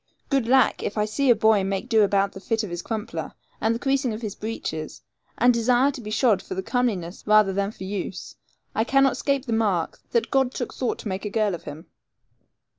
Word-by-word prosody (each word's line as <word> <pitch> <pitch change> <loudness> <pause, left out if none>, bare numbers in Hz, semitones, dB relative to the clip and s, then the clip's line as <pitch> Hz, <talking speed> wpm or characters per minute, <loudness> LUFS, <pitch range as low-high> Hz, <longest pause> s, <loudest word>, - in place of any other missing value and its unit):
Good 270 -4 +2
lack, 265 +1 +4
if 205 - -4
I 210 - +2
see 265 +6 0
a 240 - +7
boy 220 -2 +3
make 195 0 -1
to 225 - +3
do - - +7
about 200 0 +2
the - - -10
fit 225 +3 -1
of 200 - -5
his 175 0 -4
crumpler, 220 +1 -5 0.3
and 225 +1 +2
the - - -4
creasing 270 -2 0
of 220 +2 -7
his 210 -3 -3
breeches, 205 -9 -5 0.3
and 245 +1 +5
desire 245 +4 +3
to 265 -3 -8
be 215 - -7
shod 215 -3 +2
for 185 - -6
comeliness 205 -8 -1
rather 215 -2 +5
than 200 +1 0
for 210 - -10
use, 190 -1 -5 0.4
I 220 - +1
cannot 270 +1 +3
'scape 275 +1 -1
the 235 - -2
mark 200 -7 0
that 235 - 0
God 265 -1 +2
took 245 - -4
thought 255 - -2
to - - -6
make 190 0 -3
a 210 - -3
girl 210 -2 +1
of 170 - -7
him. 150 +4 -8
220 Hz, 225 wpm, -24 LUFS, 195-245 Hz, 0.4 s, a